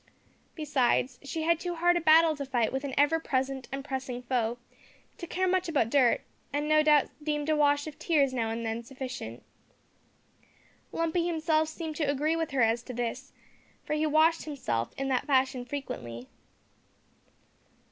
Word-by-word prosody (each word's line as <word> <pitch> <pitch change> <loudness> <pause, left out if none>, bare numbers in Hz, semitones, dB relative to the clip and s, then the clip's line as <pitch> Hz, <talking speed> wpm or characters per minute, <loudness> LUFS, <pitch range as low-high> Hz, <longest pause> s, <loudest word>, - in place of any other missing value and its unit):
Besides, 265 -4 +1
she 315 +3 -4
had 335 0 +2
too 350 -1 -3
hard 350 +1 +3
a 345 - +1
battle 320 0 +6
to 285 - -4
fight 250 -4 0
with 265 +1 -2
an 280 -2 -4
ever 290 +3 +4
present 265 -3 -2
and 275 0 -5
pressing 260 -2 -4
foe, 240 -2 -1 0.6
to 345 - -6
care 370 +3 0
much 370 -1 +1
about 250 -8 +1
dirt, 260 -4 +4 0.3
and 290 +1 -1
no 310 0 +5
doubt 300 -2 +4
deemed 295 0 -2
a 310 - +3
wash 290 -1 +3
of 310 -2 -9
tears 285 -6 +2
now 230 -3 -1
and 230 +1 -3
then 225 +1 -2
sufficient. 250 - -7 1.5
Lumpy 330 +1 0
himself 315 -2 +1
seemed 315 -1 -6
to 300 -3 0
agree 295 +3 +1
with 330 -1 -1
her 270 -5 +2
as 225 +1 +2
to 250 0 -8
this, 245 +3 -4 0.5
for - - -3
he 305 +1 +1
washed 315 +2 +3
himself 120 - -2
in 270 - -2
that 260 +2 0
fashion 260 -2 +2
frequently. 235 - -6
285 Hz, 170 wpm, -29 LUFS, 255-315 Hz, 1.5 s, battle